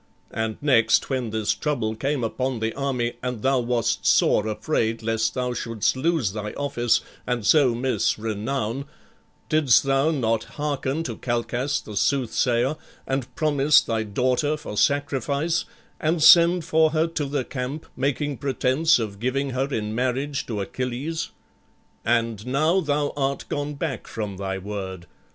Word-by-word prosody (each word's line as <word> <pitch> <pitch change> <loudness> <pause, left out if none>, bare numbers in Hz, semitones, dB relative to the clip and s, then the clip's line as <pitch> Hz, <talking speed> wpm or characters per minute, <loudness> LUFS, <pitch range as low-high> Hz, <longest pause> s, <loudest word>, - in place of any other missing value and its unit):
And 110 -1 -2
next, 115 -3 +3
when 130 -3 -1
this 110 -1 0
trouble 120 -8 -1
came 135 +3 -2
upon 130 +2 -2
the 110 0 -1
army, 130 -4 -1
and 125 -4 -4
thou 135 -1 +3
wast 120 -1 0
sore 105 - +3
afraid 115 -1 -1
lest 110 0 0
thou 125 -1 -1
shouldst 115 -2 -1
lose 135 - 0
thy 105 -1 -5
office 120 -5 +1 0.3
and 120 -4 -1
so 135 -4 +5
miss 130 +2 0
renown, 115 +4 -3 0.6
didst 155 -6 +4
thou 135 +2 +2
not 115 -7 0
hearken 145 0 -2
to - - -5
Calchas 120 +3 -1
the 105 - -9
soothsayer, 125 +2 +1 0.3
and 135 -2 -3
promise 150 -1 +4
thy 115 -1 -1
daughter 125 +7 0
for 150 -8 -7
sacrifice, 145 +5 +1 0.3
and 160 0 +1
send 170 0 +7
for 160 0 +4
her 160 0 +3
to 165 -3 -3
the 140 -1 -1
camp, 135 +4 -5
making 140 +1 -1
pretence 140 +3 +2
of 105 -4 -4
giving 135 +3 -1
her 135 +3 -1
in 105 -3 -2
marriage 130 +4 -1
to 105 -4 -3
Achilles? 130 - -3 0.7
And 115 -1 0
now 155 +8 +2
thou 145 -3 0
art 140 -1 -1
gone 145 0 -3
back 140 -3 -4
from 105 -4 -5
thy 95 0 -3
word. 95 -2 -6
130 Hz, 150 wpm, -24 LUFS, 115-145 Hz, 0.7 s, send